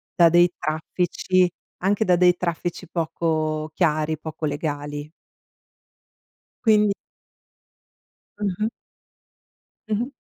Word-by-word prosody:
da 170 Hz, -2 st, +7 dB
dei 175 Hz, +1 st, +5 dB
traffici, 175 Hz, +3 st, +1 dB, 0.3 s
anche 200 Hz, +3 st, +1 dB
da 180 Hz, -, +5 dB
dei 180 Hz, 0 st, +5 dB
traffici 175 Hz, +1 st, -3 dB
poco 155 Hz, -2 st, -1 dB
chiari, 155 Hz, -2 st, +1 dB
poco 155 Hz, +1 st, -5 dB
legali. 145 Hz, 0 st, -3 dB, 1.5 s
Quindi 210 Hz, -3 st, +4 dB, 1.5 s
Mh-mh. 205 Hz, +1 st, 0 dB, 1.2 s
Mh-mh. 235 Hz, +6 st, -1 dB
170 Hz, 80 wpm, -24 LUFS, 155-185 Hz, 1.5 s, da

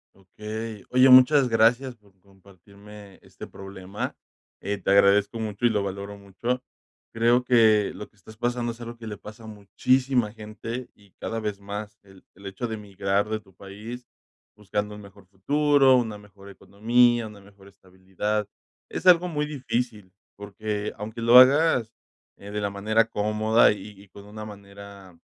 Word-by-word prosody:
Okey. 105 Hz, +2 st, -8 dB
Oye, 130 Hz, +1 st, +5 dB
muchas 130 Hz, +2 st, +7 dB
gracias 120 Hz, +3 st, +2 dB
por 100 Hz, -3 st, -28 dB
compartirme 100 Hz, +1 st, -17 dB
este -, -, -12 dB
problema. 95 Hz, 0 st, -7 dB, 0.5 s
Eh, 100 Hz, +1 st, -3 dB
te -, -, -3 dB
agradezco 100 Hz, +2 st, +4 dB
mucho, 110 Hz, +1 st, -3 dB
y -, -, +6 dB
lo 105 Hz, -3 st, 0 dB
valoro 100 Hz, +1 st, -6 dB
mucho. 115 Hz, +6 st, -4 dB, 0.5 s
Creo 120 Hz, +2 st, +2 dB
que 110 Hz, -4 st, +4 dB
lo 105 Hz, +2 st, -9 dB
que -, -, -35 dB
estás 105 Hz, +3 st, -16 dB
pasando 120 Hz, 0 st, -2 dB
es 115 Hz, +1 st, -13 dB
algo 120 Hz, 0 st, -8 dB
que 115 Hz, -1 st, -10 dB
le 105 Hz, -, -6 dB
pasa 110 Hz, +2 st, -12 dB
a -, -, -10 dB
muchísima 120 Hz, +3 st, 0 dB
gente, 115 Hz, +3 st, -7 dB
y 100 Hz, -2 st, -24 dB
cada 115 Hz, 0 st, -4 dB
vez 105 Hz, -2 st, -4 dB
más. 105 Hz, +1 st, -8 dB
El 95 Hz, -1 st, -19 dB
el 100 Hz, +2 st, -16 dB
hecho 100 Hz, +5 st, -5 dB
de 110 Hz, -, -4 dB
emigrar 100 Hz, 0 st, -2 dB
de 110 Hz, 0 st, -2 dB
tu 95 Hz, -2 st, -23 dB
país, 105 Hz, +6 st, -10 dB, 0.5 s
buscando 105 Hz, 0 st, -4 dB
un 105 Hz, -, -11 dB
mejor 100 Hz, -1 st, -16 dB
futuro, 140 Hz, +6 st, +3 dB
una 110 Hz, -4 st, -2 dB
mejor 100 Hz, -1 st, -16 dB
economía, 115 Hz, +4 st, +1 dB
una 105 Hz, -1 st, -13 dB
mejor 100 Hz, 0 st, -19 dB
estabilidad. 95 Hz, +2 st, -5 dB, 0.4 s
Es -, -, -6 dB
algo 180 Hz, 0 st, +6 dB
muy 150 Hz, -3 st, -2 dB
difícil, 120 Hz, -8 st, -4 dB, 0.2 s
porque 105 Hz, +1 st, -5 dB
aunque 110 Hz, +2 st, -7 dB
lo 120 Hz, +2 st, +6 dB
hagas, 130 Hz, -3 st, +5 dB, 0.4 s
eh, 100 Hz, -, -11 dB
de 105 Hz, 0 st, -3 dB
la 100 Hz, -, -1 dB
manera 110 Hz, +3 st, +1 dB
cómoda, 110 Hz, +2 st, +2 dB
y 100 Hz, -1 st, -9 dB
y 100 Hz, -, -17 dB
con 100 Hz, +1 st, -14 dB
una 105 Hz, +1 st, -9 dB
manera 100 Hz, -3 st, -13 dB
105 Hz, 165 wpm, -25 LUFS, 100-115 Hz, 0.5 s, muchas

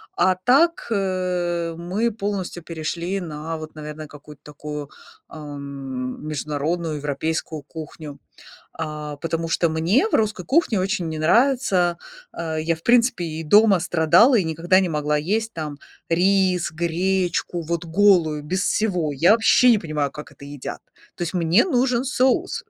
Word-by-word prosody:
А 185 Hz, -, +3 dB
так, 275 Hz, -, +2 dB
э, 180 Hz, -4 st, -1 dB
мы 195 Hz, +7 st, -1 dB
полностью 200 Hz, -5 st, -4 dB
перешли 170 Hz, +3 st, -3 dB
на 160 Hz, 0 st, -5 dB
вот, 155 Hz, 0 st, -9 dB
наверное, 155 Hz, 0 st, -8 dB
какую-то 145 Hz, 0 st, -14 dB
такую, 150 Hz, -1 st, -7 dB, 0.4 s
ам, 140 Hz, -4 st, -7 dB
международную 155 Hz, +2 st, -2 dB
европейскую 150 Hz, +1 st, -3 dB
кухню, 155 Hz, -1 st, -9 dB, 0.5 s
а 150 Hz, -2 st, -6 dB
потому 165 Hz, +1 st, -3 dB
что 170 Hz, 0 st, +1 dB
мне 170 Hz, -, +2 dB
в -, -, -12 dB
русской 210 Hz, -4 st, 0 dB
кухне 275 Hz, -, +2 dB
очень 185 Hz, -2 st, -1 dB
не 155 Hz, -, -5 dB
нравится, 190 Hz, -, +2 dB, 0.3 s
а, 160 Hz, -2 st, -4 dB
я, 160 Hz, +1 st, 0 dB
в 160 Hz, -, -19 dB
принципе, 235 Hz, -6 st, +3 dB
и 160 Hz, 0 st, -5 dB
дома 205 Hz, +4 st, +5 dB
страдала 175 Hz, -, +4 dB
и 195 Hz, -, +2 dB
никогда 165 Hz, +3 st, +2 dB
не 185 Hz, -2 st, 0 dB
могла 150 Hz, -1 st, 0 dB
есть 220 Hz, +8 st, -1 dB
там 150 Hz, -3 st, -5 dB, 0.3 s
рис, 185 Hz, 0 st, +2 dB
гречку 175 Hz, +1 st, -1 dB
вот 170 Hz, +1 st, -3 dB
голую 165 Hz, -4 st, +3 dB
без 185 Hz, +6 st, -1 dB
всего. 180 Hz, -8 st, 0 dB
Я 165 Hz, +9 st, +4 dB
вообще 230 Hz, +2 st, +5 dB
не 225 Hz, -, +4 dB
понимаю, 150 Hz, -6 st, -2 dB
как 150 Hz, 0 st, -10 dB
это 140 Hz, -, -16 dB
едят. 145 Hz, -1 st, -7 dB, 0.3 s
То -, -, -11 dB
есть, 175 Hz, +1 st, -2 dB
мне 175 Hz, +3 st, +3 dB
нужен 250 Hz, -6 st, +1 dB
соус, 270 Hz, -, 0 dB
170 Hz, 150 wpm, -22 LUFS, 155-195 Hz, 0.5 s, дома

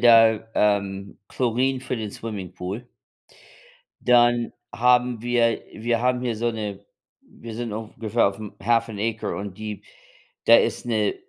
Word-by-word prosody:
da, 115 Hz, -2 st, +6 dB
ähm, 100 Hz, -1 st, 0 dB
Chlorin 130 Hz, +2 st, 0 dB
für 130 Hz, -1 st, -3 dB
den 110 Hz, -2 st, -4 dB
Swimmingpool. 100 Hz, +1 st, -6 dB, 1.2 s
Dann 120 Hz, -1 st, +4 dB, 0.2 s
haben 125 Hz, -1 st, +3 dB
wir 120 Hz, -1 st, +2 dB
wir 115 Hz, +1 st, -1 dB
haben 125 Hz, 0 st, +1 dB
hier 125 Hz, -2 st, -1 dB
so 120 Hz, +2 st, 0 dB
'ne 105 Hz, -3 st, -5 dB, 0.4 s
wir 115 Hz, -1 st, -11 dB
sind 115 Hz, -1 st, -4 dB
ungefähr 110 Hz, +1 st, 0 dB
auf'm 105 Hz, +1 st, -8 dB
half 115 Hz, +3 st, +2 dB
and 110 Hz, -3 st, -7 dB
acre 110 Hz, 0 st, -2 dB
und 100 Hz, -2 st, -6 dB
die 105 Hz, -1 st, -6 dB, 0.6 s
da -, -, +9 dB
ist -, -, 0 dB
'ne 110 Hz, -3 st, +1 dB
115 Hz, 140 wpm, -24 LUFS, 105-120 Hz, 1.2 s, da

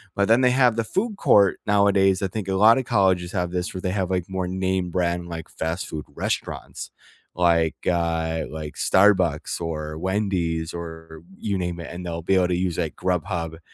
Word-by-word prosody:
But 100 Hz, 0 st, +2 dB
then 115 Hz, +3 st, +5 dB
they 125 Hz, -, +5 dB
have 125 Hz, -2 st, +3 dB
the 115 Hz, -, 0 dB
food 200 Hz, -, -2 dB
court 100 Hz, -3 st, +4 dB
nowadays, 100 Hz, -2 st, +3 dB
I -, -, +2 dB
think 100 Hz, +1 st, -5 dB
a 95 Hz, -, 0 dB
lotta 115 Hz, +6 st, +5 dB
colleges 95 Hz, -6 st, +1 dB
have 90 Hz, -2 st, -1 dB
this 90 Hz, +1 st, -3 dB
where -, -, -3 dB
they 90 Hz, -, -1 dB
have 95 Hz, -2 st, -1 dB
like 90 Hz, -2 st, -1 dB
more 95 Hz, -1 st, -3 dB
name 95 Hz, 0 st, -1 dB
brand, 85 Hz, 0 st, -1 dB
like, 80 Hz, -2 st, -7 dB
fast 80 Hz, +3 st, -3 dB
food 75 Hz, -1 st, -6 dB
restaurants, -, -, -4 dB, 0.5 s
like, 85 Hz, -2 st, +1 dB
uh, 80 Hz, -2 st, 0 dB
like 75 Hz, -1 st, -6 dB
Starbucks 95 Hz, -2 st, +2 dB
or 75 Hz, -1 st, -4 dB
Wendy's 90 Hz, -4 st, -1 dB
or 80 Hz, -2 st, -8 dB, 0.2 s
you 100 Hz, -3 st, -2 dB
name 90 Hz, -1 st, -3 dB
it, 85 Hz, -, -7 dB
and 90 Hz, +1 st, -7 dB
they'll 85 Hz, -2 st, -5 dB
be 95 Hz, -, +1 dB
able 90 Hz, -1 st, +3 dB
to 90 Hz, -, 0 dB
use 90 Hz, -2 st, -1 dB
like 80 Hz, -3 st, -2 dB
Grubhub. 85 Hz, -2 st, -2 dB
90 Hz, 190 wpm, -23 LUFS, 85-95 Hz, 0.5 s, then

